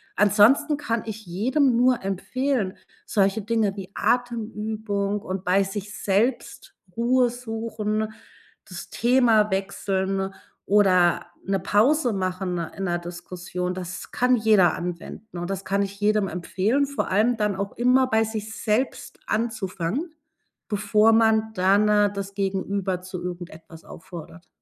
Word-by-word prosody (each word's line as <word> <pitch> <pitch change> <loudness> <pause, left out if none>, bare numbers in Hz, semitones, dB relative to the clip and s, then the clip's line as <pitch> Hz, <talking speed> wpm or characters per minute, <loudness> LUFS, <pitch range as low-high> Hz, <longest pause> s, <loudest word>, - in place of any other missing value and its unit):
Ansonsten 225 +9 +4
kann 230 -5 -2
ich 220 -1 -7
jedem 245 - +1
nur 250 0 +3
empfehlen, 210 +2 -1 0.3
solche 200 +1 +1
Dinge 215 -2 0
wie 190 -2 -7
Atemübung 215 -4 -1
und 185 0 -5
bei 190 +2 +3
sich 200 +1 -6
selbst 215 +6 -1 0.2
Ruhe 245 +1 +3
suchen, 225 -2 -3 0.6
das - - -8
Thema 235 -4 +3
wechseln 195 0 -1 0.3
oder 185 -4 +4 0.2
‘ne 195 0 0
Pause 240 - +2
machen 185 -1 -2
in 170 +4 -5
‘ner 175 -1 0
Diskussion, 175 +1 -5
das 185 0 -7
kann 250 0 +3
jeder 215 -6 +4
anwenden 180 +3 -7
und, 175 +2 -4
das 195 0 -4
kann 200 +1 0
ich 200 0 -4
jedem 210 -1 +2
empfehlen, 200 +10 0
vor 280 0 -3
allem 220 +5 +3
dann 210 -2 0
auch 200 0 -3
immer 255 +2 +3
bei 220 -2 +2
sich 220 0 -5
selbst 225 +5 -2
anzufangen, 220 - -2 0.5
bevor 210 +1 +3
man 220 -1 +3
dann 200 +3 +3 0.3
das 200 -1 -6
Gegenüber 195 -1 -2
zu 180 -1 -7
irgendetwas 170 -2 -8
auffordert. 170 -1 -11
205 Hz, 130 wpm, -24 LUFS, 190-225 Hz, 0.6 s, Ansonsten